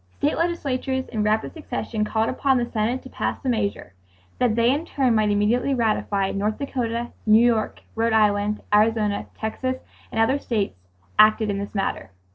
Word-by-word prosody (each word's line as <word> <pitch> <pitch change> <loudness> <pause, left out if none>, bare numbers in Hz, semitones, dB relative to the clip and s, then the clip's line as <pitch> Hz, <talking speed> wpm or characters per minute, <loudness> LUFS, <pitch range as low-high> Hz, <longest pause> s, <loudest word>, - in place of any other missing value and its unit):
State 295 - +1
legislatures 270 -6 -1
in 220 -3 -2
rapid 215 +1 0
succession 245 -8 -3
called 220 +1 0
upon 265 0 +1
the 240 - +1
Senate 235 +2 -1
to - - -10
pass - - -2
the 265 - -1
measure, 200 - -2 0.5
that 245 -3 +2
they 235 +1 +4
in 295 +3 -2
turn 270 -7 +1
might 215 -1 +2
immediately 225 +6 +2
ratify. 210 -4 0
North 210 +2 -1
Dakota, 240 -4 -3 0.2
New 220 +2 +6
York, 225 -3 0
Rhode 230 +1 +1
Island, 210 -1 +2
Arizona, 210 -1 +2
Texas 255 +4 -2 0.4
and 225 - -2
other 245 +5 +3
states 210 - -2 0.4
acted 215 0 +5
in 200 - -2
this 200 +1 -6
matter. 195 - -2
225 Hz, 170 wpm, -23 LUFS, 210-255 Hz, 0.5 s, New